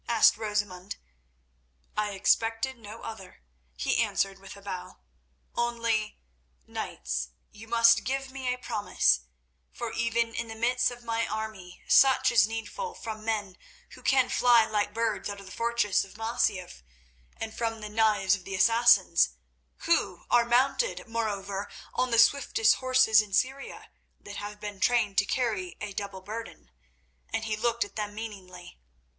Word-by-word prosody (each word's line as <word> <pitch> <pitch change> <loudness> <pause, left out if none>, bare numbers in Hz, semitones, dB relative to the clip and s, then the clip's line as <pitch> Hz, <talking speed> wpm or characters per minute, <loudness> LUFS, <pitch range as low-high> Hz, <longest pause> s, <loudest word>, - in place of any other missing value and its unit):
asked 230 -2 +5
Rosamund. 205 -3 -3 1.0
"I 210 -1 -1
expected 225 +6 +1
no 225 -1 -11
other," 195 - -9 0.3
he - - 0
answered 195 0 0
with 195 +1 -11
a - - -13
bow. 185 -3 -7 0.6
"Only, 230 -2 -1 0.5
knights, 60 -1 -4 0.2
you 220 +2 -13
must 230 0 +5
give 270 0 -3
me 260 -2 -3
a 250 - -2
promise, 210 - +1 0.5
for 235 -2 -5
even 230 0 0
in 230 - -3
the 225 - -8
midst 245 +2 +1
of 245 0 -10
my 230 0 -1
army 215 -4 -6
such 270 -1 +5
is 230 -3 +5
needful 445 - -5
from 215 -1 -7
men 210 -4 -3 0.3
who - - -13
can 260 -2 +3
fly 240 -2 +5
like 210 -1 -1
birds 225 -1 -1
out 200 0 -6
of 195 - -12
the 185 - -12
fortress 230 -3 +1
of 195 +1 -13
Masyaf 225 - -1 0.6
and 220 -1 -5
from 225 -1 -2
the 210 - -5
knives 210 -3 +2
of 200 -2 -2
the 195 +1 -5
Assassins—who 170 - +2
are 240 -1 +5
mounted, 265 - +1
moreover, 205 -3 -3 0.2
on 255 0 0
the 230 - +1
swiftest 230 -2 +4
horses 255 -4 +4
in 210 -2 -10
Syria 265 +6 -2 0.3
that 205 0 -9
have 205 0 -7
been 205 -2 -7
trained 210 -2 +2
to 205 - +1
carry 210 -7 -2
a 205 -1 -6
double 200 -1 -5
burden," 210 - -8 0.6
and 225 - -2
he 215 -1 -1
looked 235 +2 0
at 205 - -13
them 205 -1 -4
meaningly. 185 - -9
220 Hz, 150 wpm, -28 LUFS, 200-235 Hz, 1.0 s, asked